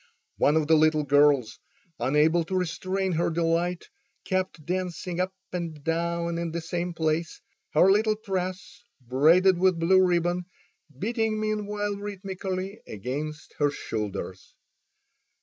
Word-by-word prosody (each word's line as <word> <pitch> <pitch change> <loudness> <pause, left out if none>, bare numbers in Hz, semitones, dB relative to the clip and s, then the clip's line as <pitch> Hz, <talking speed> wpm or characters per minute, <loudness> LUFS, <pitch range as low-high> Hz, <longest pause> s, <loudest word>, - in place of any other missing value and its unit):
One 150 +2 +3
of 155 - +2
the 160 - +3
little 155 -1 +4
girls, 145 -4 +3 0.4
unable 150 +7 +3
to 190 - -3
restrain 185 +2 -1
her 170 0 +1
delight, 170 +1 0 0.4
kept 185 -5 -2
dancing 180 -1 -3
up 185 +1 0 0.2
and 165 -4 -4
down 170 +1 -1
in 170 -1 -3
the 170 - -1
same 175 +1 -3
place, 160 0 -1 0.4
her 180 +5 +6
little 215 +2 +3
tress 185 -2 -4 0.2
braided 160 +9 +4
with 185 -1 +3
blue 185 +3 +5
ribbon 175 0 +1 0.5
beating 220 - -1
meanwhile 210 -1 -2
rhythmically 195 -1 -5
against 145 +9 -5
her 145 -1 +3
shoulders. 105 -7 -5
170 Hz, 125 wpm, -26 LUFS, 155-185 Hz, 0.5 s, her